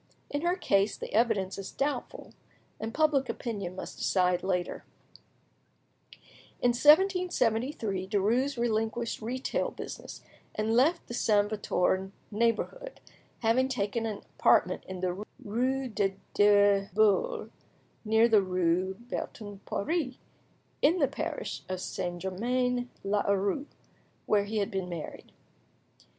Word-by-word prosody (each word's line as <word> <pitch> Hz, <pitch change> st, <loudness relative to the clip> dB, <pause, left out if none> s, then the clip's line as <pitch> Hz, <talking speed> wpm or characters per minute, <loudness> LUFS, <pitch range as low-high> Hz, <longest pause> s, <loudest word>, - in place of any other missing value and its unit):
In 290 Hz, -, -1 dB
her 350 Hz, +2 st, +1 dB
case 200 Hz, -, +1 dB
the -, -, -7 dB
evidence 210 Hz, -4 st, +1 dB
is 195 Hz, -, -6 dB
doubtful, 285 Hz, +1 st, -3 dB, 0.5 s
and 220 Hz, +1 st, -4 dB
public 290 Hz, -2 st, +2 dB
opinion 200 Hz, -7 st, -4 dB
must -, -, -7 dB
decide 180 Hz, -2 st, +2 dB
later. 180 Hz, -2 st, -2 dB, 1.8 s
In 245 Hz, -, +3 dB
1773, 255 Hz, -, +3 dB
Derues 230 Hz, +7 st, +1 dB
relinquished 230 Hz, 0 st, -1 dB
retail 250 Hz, +4 st, -2 dB
business, -, -, -8 dB, 0.3 s
and 220 Hz, +1 st, 0 dB
left 300 Hz, +8 st, +3 dB
the -, -, -8 dB
Saint 205 Hz, -3 st, +2 dB
Victor 190 Hz, -2 st, 0 dB, 0.2 s
neighbourhood, 235 Hz, -, -1 dB, 0.4 s
having 240 Hz, +3 st, +3 dB
taken 225 Hz, -2 st, -1 dB
an 210 Hz, -2 st, -5 dB, 0.2 s
apartment -, -, +3 dB
in 185 Hz, -1 st, -6 dB
the 185 Hz, +2 st, -2 dB, 0.2 s
rue 255 Hz, +5 st, 0 dB
des 200 Hz, -4 st, -1 dB, 0.2 s
Deux 205 Hz, -1 st, +5 dB
Boules, 220 Hz, -, +2 dB, 0.5 s
near 220 Hz, +1 st, +4 dB
the 220 Hz, -3 st, +5 dB
rue 185 Hz, 0 st, 0 dB
Bertin 205 Hz, -2 st, -6 dB
Poiree, 295 Hz, +4 st, -1 dB, 0.6 s
in 320 Hz, +6 st, +4 dB
the 285 Hz, -6 st, +3 dB
parish 275 Hz, -, -4 dB
of 185 Hz, -1 st, -2 dB
St. 175 Hz, -1 st, -4 dB
Germain 245 Hz, +6 st, -1 dB
l'Auxerrois, 200 Hz, +4 st, +1 dB, 0.6 s
where 205 Hz, -1 st, +2 dB
he 215 Hz, +2 st, -3 dB
had 200 Hz, -2 st, 0 dB
been 190 Hz, -2 st, -3 dB
married. 170 Hz, -3 st, -7 dB
220 Hz, 120 wpm, -29 LUFS, 195-255 Hz, 1.8 s, Deux